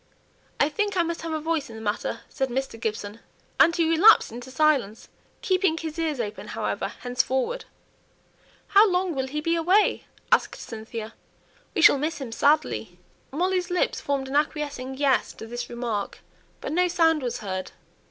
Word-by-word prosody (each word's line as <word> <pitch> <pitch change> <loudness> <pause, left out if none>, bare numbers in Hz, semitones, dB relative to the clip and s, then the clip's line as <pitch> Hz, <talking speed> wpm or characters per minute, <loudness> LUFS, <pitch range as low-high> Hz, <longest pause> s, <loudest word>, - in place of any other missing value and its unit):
"I 285 - +4
think 405 +6 -1
I 345 - +4
must 335 0 -3
have 330 - -4
a 315 - -1
voice 315 -3 -2
in 225 - -10
the 220 - -8
matter," 210 +1 -2
said 265 -1 -2
Mr. 255 -2 -3
Gibson; 215 -1 -4 0.4
and 335 - +6
he 335 -2 +2
relapsed 330 - +6
into 245 +3 -8
silence, 260 -6 +1 0.3
keeping 370 -6 +2
his 320 0 -5
ears 310 -5 -1
open, 210 -3 -4
however, - - -2
henceforward. 260 - -1 1.0
"How 415 +1 +6
long 360 -1 0
will 265 -2 -2
he 300 +3 -3
be 330 +2 +1
away?" 365 +6 +2 0.3
asked - - +3
Cynthia. 225 0 -7 0.6
"We 335 - +2
shall 285 - +7
miss 310 +3 -2
him 260 -5 -6
sadly." 295 +6 +1 0.3
Molly's 360 +4 0
lips 360 0 0
formed 275 -1 -2
an 270 - -5
acquiescing 285 -3 -1
"yes" 275 -2 +2
to - - -9
this 240 +1 -6
remark, 235 -4 -4 0.4
but - - -4
no 360 +3 +3
sound 325 -3 +3
was 245 -3 -3
heard. 185 -2 -4
290 Hz, 170 wpm, -25 LUFS, 245-335 Hz, 1.0 s, shall